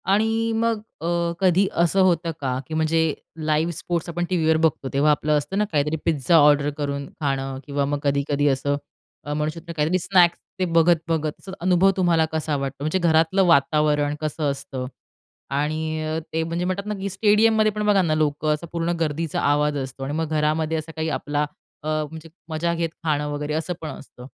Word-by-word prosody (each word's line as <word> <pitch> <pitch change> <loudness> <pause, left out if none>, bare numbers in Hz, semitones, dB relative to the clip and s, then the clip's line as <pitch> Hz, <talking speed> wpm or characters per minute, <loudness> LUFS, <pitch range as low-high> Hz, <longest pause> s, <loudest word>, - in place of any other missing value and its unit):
आणि 225 +3 +2
मग 230 -1 +1 0.2
अ, 170 0 0
कधी 190 +1 +3
असं 175 +3 +2
होतं 175 -2 +2
का 130 -2 -1
की - - -7
म्हणजे 160 +1 +1 0.5
लाईव्ह 155 +2 +1
स्पोर्ट्स 170 +2 -3
आपण 175 +1 -2
टीव्हीवर 160 -3 +2
बघतो, 160 -4 +1
तेव्हा 145 +2 +4
आपलं 150 0 +2
असतं 150 +7 -3
ना 210 - +2
काहीतरी 150 0 +1
पिझ्झा 160 0 +2
ऑर्डर 145 -1 +5
करून 140 -1 -3 0.2
खाणं 135 -2 -2
किंवा 140 -1 -1
मग 145 +1 -1
कधी-कधी 140 0 +1
असं 140 +1 +1 0.5
अ, 145 - -4
म्हणु 150 +1 0
शकतो 170 0 -8
काहीतरी 160 +5 +2
स्नॅक्स, 175 -1 +4 0.2
ते 185 - +2
बघत-बघत 165 0 +1
अनुभव 185 +2 +4
तुम्हाला 170 -3 +3
कसा 155 -1 -1
वाटतो, 135 0 -4
म्हणजे 155 +5 0
घरातलं 165 +2 +3
वातावरण 150 -1 +3
कसं 155 0 -3
असतं 135 -2 -6 0.7
आणि 155 +1 -2
अ, 155 +1 -2
ते 160 0 +1
म्हणजे 170 +2 -2
म्हणतात 185 +2 -2
ना, 210 - -1
की 195 +1 -3
स्टेडियममध्ये 215 +2 +3
पण 210 0 -3
बघा 205 -2 +4
ना 160 -4 +1
लोकं 155 0 +1
असा 150 +3 -5
पूर्ण 170 0 -1
गर्दीचा 160 0 -1
आवाज 145 0 +2
असतो. 135 0 -5
आणि 140 +2 -3
मग 160 -1 -1
घरामध्ये 155 +1 +1
असा 155 +1 -6
काही 160 0 -2
आपला 145 0 -1 0.4
अ, - - -5 0.2
म्हणजे 160 0 -10 0.2
मजा 165 +2 -1
घेत 165 0 -1
खाणं 150 -2 0
वगैरे, 145 +1 -3
असं 160 +3 -2
पण 160 - -5
असतं. 130 -3 -11
160 Hz, 185 wpm, -23 LUFS, 150-175 Hz, 0.7 s, ऑर्डर